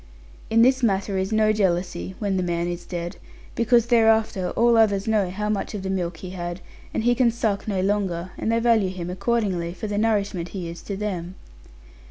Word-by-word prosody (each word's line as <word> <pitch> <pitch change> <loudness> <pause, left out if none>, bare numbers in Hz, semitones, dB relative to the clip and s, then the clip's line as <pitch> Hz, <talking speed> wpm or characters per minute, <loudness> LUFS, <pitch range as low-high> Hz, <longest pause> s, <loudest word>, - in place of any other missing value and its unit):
In 230 +1 +5
this 260 +1 +4
matter 200 -3 +1
is 190 +2 -2
no 215 0 +3
jealousy 180 -2 -1
(when 200 -3 -1
the 185 - +1
man 170 -1 -1
is 175 0 -5
dead); 175 0 -5 0.4
because 235 0 +3
thereafter 220 -5 +3
all 235 0 +4
others 205 -3 +3
know 210 -4 +2
how 210 +3 -3
much 210 0 -2
of 195 - -5
the 190 - -2
milk 175 -3 -3
be 185 - -6
had; 175 -1 -5 0.3
and - - -2
he 240 +1 +4
can 245 -1 +3
suck 220 -4 -1
no 195 -3 0
longer; 190 -3 -1
and 225 - -1
they 230 - +2
value 230 -4 +3
him 180 -1 -5
accordingly, 190 -4 -1
for 215 - -6
the 205 -1 -1
nourishment 200 -5 0
he 175 -2 -4
is 170 +1 -8
to 200 - -5
them. 185 -3 -4
200 Hz, 205 wpm, -24 LUFS, 180-220 Hz, 0.4 s, In